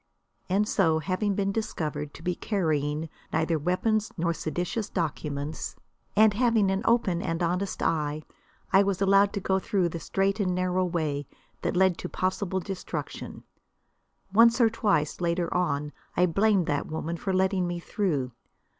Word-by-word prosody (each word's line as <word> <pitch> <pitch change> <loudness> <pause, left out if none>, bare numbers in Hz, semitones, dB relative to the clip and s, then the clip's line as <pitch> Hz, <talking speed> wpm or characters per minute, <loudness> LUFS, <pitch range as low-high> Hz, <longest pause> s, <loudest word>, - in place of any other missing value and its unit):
And 200 +3 +2
so, 165 -7 +3
having 195 +5 -1
been 195 0 0
discovered 155 -9 -3
to 160 - -12
be 180 0 0
carrying 155 -6 -1 0.2
neither 160 0 +1
weapons 210 +7 0
nor 170 0 +1
seditious 175 +7 -3
documents, 150 -3 -3 0.4
and 215 0 +6
having 225 -3 +3
an 195 +1 0
open 215 -7 +2
and 165 0 -2
honest 180 +3 -1
eye, 155 -1 0 0.5
I 195 - +7
was 200 -2 0
allowed 195 +1 +4
to - - -1
go 190 0 +1
through 190 -4 0
the 170 - -5
straight 195 +4 0
and 185 -3 +1
narrow 185 0 +1
way 155 -5 -2 0.3
that - - -1
led 185 -1 +3
to - - -5
possible 185 0 -1
destruction. 190 0 -6 0.9
Once 230 +3 +6
or 230 -2 +5
twice, 180 -9 0
later 170 0 0
on, 150 -4 0 0.3
I 180 - +5
blamed 195 +1 +3
that 145 -2 -1
woman 160 +1 -3
for 190 +3 -3
letting 190 -1 +2
me 175 0 -3
through. 160 -9 -1
180 Hz, 155 wpm, -27 LUFS, 160-200 Hz, 0.9 s, I